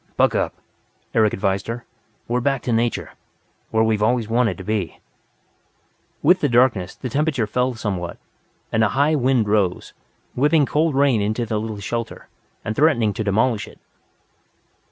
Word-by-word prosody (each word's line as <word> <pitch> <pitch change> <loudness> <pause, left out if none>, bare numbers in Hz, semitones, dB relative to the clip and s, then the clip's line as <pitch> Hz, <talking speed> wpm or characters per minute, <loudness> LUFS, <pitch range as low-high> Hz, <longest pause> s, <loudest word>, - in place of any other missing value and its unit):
"Buck - - +4
up," - - -1 0.6
Eric 110 -2 +3
advised 95 0 -1
her. 115 +1 -5 0.4
"We're 125 +1 0
back 135 0 0
to 120 - -1
nature 115 -8 -1 0.6
where 110 0 +2
we've 110 -2 +1
always 115 0 +1
wanted 115 -3 +1
to 95 - -8
be." 105 -3 -3 1.2
With 180 +5 +5
the 145 - +1
darkness, 120 -7 +2
the - - -6
temperature 140 -1 0
fell 125 +4 -1
somewhat, 95 -6 -4 0.5
and 110 - +2
a 110 - +3
high 145 +3 +3
wind 130 -6 +2
rose, 100 -4 0 0.4
whipping 145 +3 +3
cold 155 +1 +1
rain 135 -5 +3
into 110 +4 -1
the 110 -1 -2
little 110 -1 -5
shelter, 115 +3 -5 0.4
and 110 - -2
threatening 120 -9 +3
to 110 - -3
demolish 110 +2 +1
it. - - -15
115 Hz, 155 wpm, -21 LUFS, 105-130 Hz, 1.2 s, With